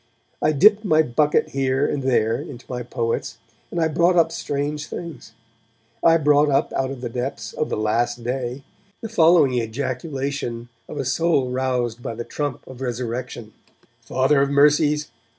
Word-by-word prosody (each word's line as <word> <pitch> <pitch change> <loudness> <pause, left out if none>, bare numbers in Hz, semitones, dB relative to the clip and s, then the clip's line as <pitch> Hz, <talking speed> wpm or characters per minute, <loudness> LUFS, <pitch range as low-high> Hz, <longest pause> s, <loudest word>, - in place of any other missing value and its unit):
I 155 - +3
dipped 205 +8 +5
my 160 -6 +4
bucket 150 +3 +1
here 135 0 0
and 145 - -1
there 115 -4 +1
into 125 -3 -10
my 125 -1 -4
poets, 115 -1 -3 0.3
and 170 - -3
I 160 - +3
brought 170 +3 +2
up 165 -1 +4
strange 145 -1 -3
things. 155 -10 -8 0.7
I 165 0 +6
brought 150 -1 +3
up 135 - +1
out 130 -1 -1
of 135 -2 -7
the 125 - -3
depths 120 -2 -4
of 155 - -2
'The - - -2
Last 115 +3 0
Day' 125 +2 -3 0.4
the 225 - -5
following 165 - +4
ejaculation 130 0 -4 0.2
of - - -7
a 140 - -2
soul 140 -1 +1
roused 125 -2 -1
by 115 - -5
the 120 +1 -5
trump 145 -4 -4
of 130 0 -11
resurrection: 120 -2 -4 0.5
Father 135 +2 +2
of 140 - +2
mercies! 150 +1 +3
135 Hz, 165 wpm, -22 LUFS, 120-150 Hz, 0.7 s, I